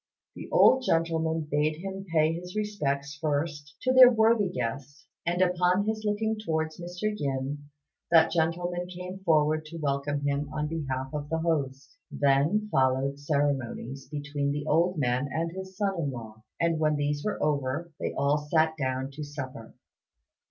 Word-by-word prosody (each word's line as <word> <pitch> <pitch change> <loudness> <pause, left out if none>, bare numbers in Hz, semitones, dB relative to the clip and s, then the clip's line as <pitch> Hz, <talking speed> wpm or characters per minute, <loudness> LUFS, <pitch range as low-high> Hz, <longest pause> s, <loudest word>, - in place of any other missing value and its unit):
The - - -9
old 260 0 +5
gentleman 165 -4 +1
bade 150 0 0
him 195 +3 -6
pay 160 0 +3
his 180 +3 -7
respects 145 -10 -2
first 150 0 -2
to 255 - +2
their 255 -1 +10
worthy 220 -3 +3
guest; 140 -2 -5 0.2
and 175 +2 +3
upon 180 +2 +2
his 220 0 -2
looking 215 +1 0
towards 160 -5 -2
Mr. 180 +5 -3
Yin, 145 -2 -3 0.4
that 165 -1 +6
gentleman 175 +2 0
came 180 +1 -7
forward 155 -3 +2
to 165 +2 -8
welcome 145 -1 -1
him 140 0 -1
on 150 - -2
behalf 135 -4 -3
of 145 -1 -4
the 160 - 0
host. 140 -5 -2
Then 145 +10 +2
followed 135 +1 +1
ceremonies 140 -3 -2
between 145 -1 -2
the 145 0 -3
old 170 +4 +2
man 130 0 0
and 165 +1 -1
his 190 +1 -8
son 200 -2 +1
in 145 -4 -1
law; 110 -4 -8 0.2
and 165 -1 +1
when 155 -1 +2
these 145 0 -1
were 210 - -1
over, 145 +2 -1
they - - -2
all 140 +2 +2
sat 155 +1 +1
down 130 -1 -2
to 150 +2 -7
supper. 135 -6 -8
155 Hz, 160 wpm, -28 LUFS, 140-175 Hz, 0.4 s, their